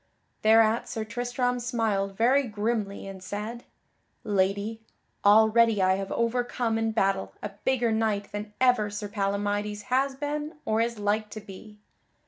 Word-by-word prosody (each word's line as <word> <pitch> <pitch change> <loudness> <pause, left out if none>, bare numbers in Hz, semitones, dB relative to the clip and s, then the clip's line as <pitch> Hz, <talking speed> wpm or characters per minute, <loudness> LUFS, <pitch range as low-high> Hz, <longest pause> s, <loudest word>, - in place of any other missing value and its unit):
Thereat 220 +1 +4
Sir 220 - -3
Tristram 245 +2 -1
smiled 220 -5 -1
very 260 +4 +3
grimly, 210 -2 -2
and 195 -1 -8
said: 210 +5 -6 0.6
"Lady, 205 +2 0 0.4
already 220 +1 +5
I 185 0 +4
have 195 0 -5
overcome 235 -1 0
in 225 0 0
battle 195 - 0
a 205 - -2 0.2
bigger 245 -3 +2
knight 215 -2 0
than 210 0 -5
ever 250 -5 +3
Sir 205 0 -5
Palamydes 205 0 -2
has 270 +1 +2
been 295 +3 -4
or 220 +1 +1
is 235 0 -1
like 210 +1 0
to 215 - -7
be." 210 +1 -12
220 Hz, 140 wpm, -27 LUFS, 205-235 Hz, 0.6 s, already